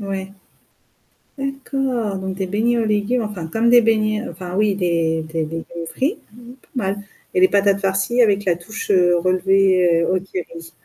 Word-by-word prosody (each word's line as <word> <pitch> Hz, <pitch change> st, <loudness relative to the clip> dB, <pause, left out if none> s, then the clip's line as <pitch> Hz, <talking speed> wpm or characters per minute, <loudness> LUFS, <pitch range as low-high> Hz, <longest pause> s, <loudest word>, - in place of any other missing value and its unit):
Ouais, 195 Hz, -1 st, -5 dB, 1.1 s
d'accord. 270 Hz, -5 st, -2 dB
Donc 190 Hz, 0 st, -5 dB
des 190 Hz, -, -2 dB
beignets 225 Hz, +5 st, +1 dB
aux 230 Hz, -, +1 dB
légumes, 215 Hz, +3 st, 0 dB
enfin 205 Hz, -6 st, -5 dB
comme 225 Hz, +8 st, 0 dB
des 240 Hz, 0 st, +7 dB
beignets, 215 Hz, -1 st, +1 dB
heu, -, -, -6 dB
enfin, 180 Hz, +1 st, -8 dB
oui, 210 Hz, -1 st, +2 dB
des 165 Hz, -3 st, 0 dB
des 160 Hz, 0 st, -3 dB
légumes 165 Hz, +1 st, -6 dB
frits, 290 Hz, -, 0 dB, 0.2 s
mmh -, -, -18 dB
mh -, -, -12 dB, 0.2 s
pas -, -, -27 dB
mal. 200 Hz, -5 st, -1 dB, 0.4 s
Et -, -, +2 dB
les 185 Hz, -, +7 dB
patates 200 Hz, 0 st, +2 dB
farcies 195 Hz, +5 st, +1 dB
avec 205 Hz, -3 st, +2 dB
la 175 Hz, -3 st, +2 dB
touche, 200 Hz, +6 st, -5 dB
heu, 175 Hz, -2 st, +4 dB
relevées, 185 Hz, -1 st, +3 dB
heu, 180 Hz, +3 st, +1 dB
au -, -, +1 dB
curry. 170 Hz, -3 st, -8 dB
195 Hz, 190 wpm, -20 LUFS, 175-215 Hz, 1.1 s, des